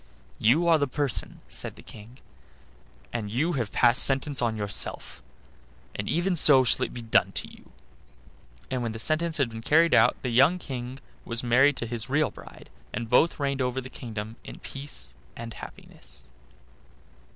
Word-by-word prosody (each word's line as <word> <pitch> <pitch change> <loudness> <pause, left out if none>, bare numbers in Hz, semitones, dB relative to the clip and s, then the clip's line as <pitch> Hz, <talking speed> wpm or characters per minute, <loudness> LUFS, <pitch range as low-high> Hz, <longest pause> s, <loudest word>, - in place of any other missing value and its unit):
"You 145 +11 +3
are 165 -2 +5
the 145 - +1
person," 140 -2 -2
said - - -4
the - - -15
King, 115 +4 -14 1.0
"and 105 -3 -3
you 140 +11 0
have 120 -7 -2
passed 120 +2 +4
sentence 135 0 +2
on 115 -2 0
yourself; 100 -10 -1 0.7
and 100 - -5
even 175 +2 0
so 145 -4 +8
it - - -1
shall - - +2
be 120 - -9
done 115 - +2
to - - -1
you." - - -17 1.0
And 130 -1 -1
when 115 -2 -3
the - - -6
sentence 160 +7 +1
had 135 -5 0
been 115 0 -7
carried 165 +6 +3
out 115 +2 +5
the 125 - -1
young 140 +9 +4
King 130 -5 -7 0.3
was 115 +1 -1
married 130 +4 +4
to - - -3
his 115 +1 -3
real 150 +3 +1
bride, - - -14 0.2
and 115 -1 -5
both 160 +7 +3
reigned 140 -1 -1
over 125 0 -1
the 130 0 -9
kingdom 110 -2 -7
in - - -10
peace 135 - -5 0.2
and 115 -1 -8
happiness. - - -10
125 Hz, 175 wpm, -26 LUFS, 115-145 Hz, 1.0 s, so